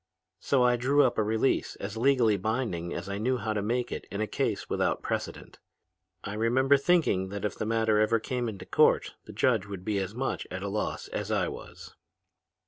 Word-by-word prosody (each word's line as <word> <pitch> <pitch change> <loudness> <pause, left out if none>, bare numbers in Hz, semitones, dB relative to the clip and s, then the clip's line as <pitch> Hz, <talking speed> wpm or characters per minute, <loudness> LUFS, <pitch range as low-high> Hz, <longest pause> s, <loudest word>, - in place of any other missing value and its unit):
So 135 -3 +2
I 125 0 +4
drew 140 +4 +3
up 125 -4 +1
a - - +3
release 110 +5 0
as 100 +2 -6
legally 120 -3 +3
binding 100 -4 -2
as 85 +2 -5
I 100 0 -3
knew 125 +4 +1
how 110 -2 -2
to 105 - -1
make 120 +4 -1
it - - -5
in 100 - -5
a 110 - +1
case - - -2
without - - 0
precedent. - - -4 0.6
I 100 - -5
remember 125 +6 +3
thinking 140 - +2
that 100 +1 -4
if 105 - -1
the 110 - -3
matter 110 -1 +2
ever 110 +2 +3
came 125 0 -2
into 100 -3 -8
court - - +3
the - - -10
judge 115 -6 +1
would 95 -2 -7
be 105 -2 0
as 95 +2 -4
much 135 +2 -2
at 90 +1 -5
a 100 - -2
loss 105 +1 -3
as - - -4
I - - +1
was. - - -10
110 Hz, 210 wpm, -28 LUFS, 100-125 Hz, 0.6 s, I